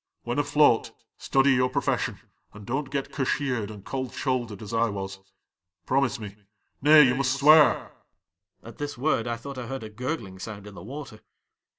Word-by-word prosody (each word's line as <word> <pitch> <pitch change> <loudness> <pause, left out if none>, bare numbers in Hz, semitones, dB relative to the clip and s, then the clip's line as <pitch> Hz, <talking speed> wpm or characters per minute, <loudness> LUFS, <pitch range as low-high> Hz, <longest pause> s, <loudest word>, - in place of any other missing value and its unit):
When - - -2
afloat, - - +3 0.3
study 135 0 +3
your 125 -1 +3
pro - - -1
fession - - -1 0.4
and 105 -1 -11
don't 135 +4 -2
get 135 -1 -3
cashiered 130 -5 -1
and 105 -2 -11
cold 130 -2 -4
shouldered 120 -6 -2
as 105 - -8
I 115 0 +2
was. 95 -1 -5 0.7
Pfomise 135 -3 +1
me 105 -2 -8 0.2
— - - -48
nay, 150 +2 +8
you 125 -3 +4
must 135 0 0
swear! 150 -1 +5 0.3
" 85 - -60
' 95 -1 -46
At 115 -1 -12
this 145 -2 -4
word 125 -3 0
1 120 0 -2
thought 135 +2 -8
I 120 - -6
heard 135 -1 -5
a 110 - -7
gurgling 115 -5 -5
sound 100 +1 -8
in 105 - -10
the 95 - -10
water. 130 +1 -8
125 Hz, 195 wpm, -26 LUFS, 105-135 Hz, 0.7 s, nay